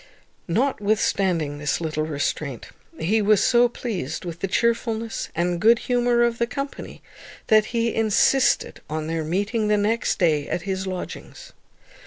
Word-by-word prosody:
Notwithstanding 195 - 0
this 150 -1 -1
little 155 -2 -2
restraint, 145 -3 -3 0.3
he 210 +7 +1
was 210 -1 +4
so 240 0 +4
pleased 185 - -5
with 170 -1 -6
the 195 - -2
chearfulness 230 +1 -1
and 175 +1 -1
good 230 +2 +6
humour 245 0 +1
of 235 -1 0
the 235 - +1
company, 275 +3 -6 0.5
that 215 -1 +5
he 230 -1 -1
insisted 225 +4 +2
on 155 0 -3
their 165 0 -2
meeting 205 +7 -1
the 210 0 +3
next 215 +3 0
day 155 -6 +1
at 175 - -2
his 190 -1 -3
lodgings. 185 -1 -7
205 Hz, 145 wpm, -23 LUFS, 165-230 Hz, 0.5 s, good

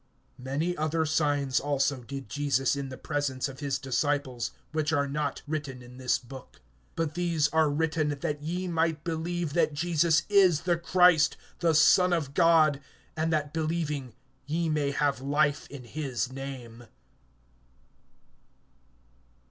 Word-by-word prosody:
(30)Many 145 +7 -1
other 160 +1 0
signs 145 -3 +1
also 140 -1 0
did 135 +2 -7
Jesus 140 -2 0
in 140 -1 -4
the 130 - -8
presence 140 -3 -2
of 135 -1 -10
his 140 -2 -1
disciples, 135 -3 -1 0.2
which 155 0 -1
are 140 -2 +1
not 145 0 -3
written 145 -5 -5
in 125 +1 -13
this 130 -1 +1
book. 130 +1 -12 0.4
(31)But 165 -2 -1
these 170 -3 +1
are 160 -1 +3
written, 155 +1 0
that 145 0 -3
ye 175 +4 -3
might 165 -3 0
believe 165 -1 -3
that 155 -3 +1
Jesus 160 0 +2
is 190 -6 +4
the 175 +1 +1
Christ, 170 -3 +4 0.2
the 165 -2 +2
Son 180 +4 +5
of 145 -5 -1
God, 160 -4 +4 0.3
and 160 +1 0
that 150 -2 -1
believing 155 -5 -2 0.3
ye 165 +2 -1
may 150 -2 0
have 140 -2 0
life 145 +1 +1
in 140 -3 -9
his 130 -1 -3
name. 125 -3 -8
150 Hz, 140 wpm, -28 LUFS, 140-160 Hz, 0.4 s, Son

